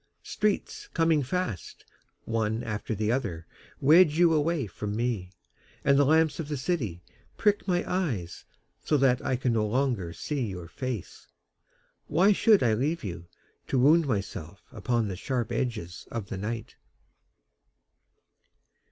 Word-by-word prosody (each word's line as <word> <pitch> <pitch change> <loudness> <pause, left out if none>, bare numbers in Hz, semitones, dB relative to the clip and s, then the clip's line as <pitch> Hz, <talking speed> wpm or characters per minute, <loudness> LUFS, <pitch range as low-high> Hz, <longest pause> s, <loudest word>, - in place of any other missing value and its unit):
Streets 210 -1 -2
coming 165 -3 +3
fast, 135 - -4 0.4
One 110 0 -1
after 110 0 -3
the 105 +2 0
other, 90 -10 -2 0.3
Wedge 155 +2 +6
you 170 -1 +5
away 155 -2 +1
from 105 +2 -5
me, 115 -6 -1 0.6
And 140 - +5
the 140 0 +5
lamps 160 +1 +3
of 160 - -3
the 150 -1 -3
city 125 - -2 0.3
prick 205 -1 +2
my 175 -2 +1
eyes 130 - -2 0.4
So 150 - +2
that 130 -2 +3
I 130 - 0
can 125 -1 0
no 110 -1 +2
longer 120 -7 0
see 130 - -3
your 90 -4 -6
face. 125 +1 -6 0.8
Why 180 +7 +4
should 210 +1 +5
I 115 -3 +3
leave 145 +9 -1
you, 85 -4 -6 0.4
To 135 - 0
wound 150 +5 +5
myself 100 - -4
upon 115 +1 -1
the 95 - -4
sharp 120 +4 -2
edges 115 -8 -3
of 110 -4 -5
the 100 - -4
night? 110 +2 -5
125 Hz, 145 wpm, -28 LUFS, 105-155 Hz, 0.8 s, Wedge